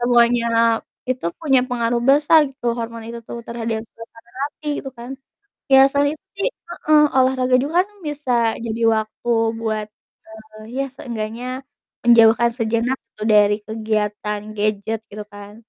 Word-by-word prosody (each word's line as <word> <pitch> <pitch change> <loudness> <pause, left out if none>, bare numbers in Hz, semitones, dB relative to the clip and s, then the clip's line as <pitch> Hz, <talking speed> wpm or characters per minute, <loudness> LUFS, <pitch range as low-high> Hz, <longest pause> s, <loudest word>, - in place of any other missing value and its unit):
semuanya 240 -1 +3 0.7
itu 255 -8 -2
punya 270 -5 +3
pengaruh 235 -1 0
besar 300 +3 +5
gitu 260 -2 -9
hormon 230 0 -5
itu 235 0 -6
tuh - - -6
terhadap 230 -1 -3
suasana 230 0 -13 0.2
hati 300 +1 -10
gitu 270 - -7
kan, 240 +2 -9 0.6
ya 270 - +9
selain 285 +2 +1
itu 380 - -60
sih 395 - +1 0.2
heeh, 310 -3 +3 0.2
olahraga 255 0 +2
juga 290 - -3
kan - - -21 0.2
bisa 295 -3 -3 0.3
jadi 225 +1 -4 0.2
waktu 220 +2 -4 0.3
buat, 215 -2 -2 0.7
eee, - - -11
ya 275 - 0
seenggaknya 230 -2 -5 0.6
menjauhkan 235 0 +6
sejenak 230 +2 0 0.2
tuh 215 - -4
dari 205 0 +5
kegiatan 210 -1 -2 0.2
gadget 215 +1 -1
gitu 210 +1 -7
kan. 205 0 -11
235 Hz, 140 wpm, -20 LUFS, 220-260 Hz, 0.7 s, ya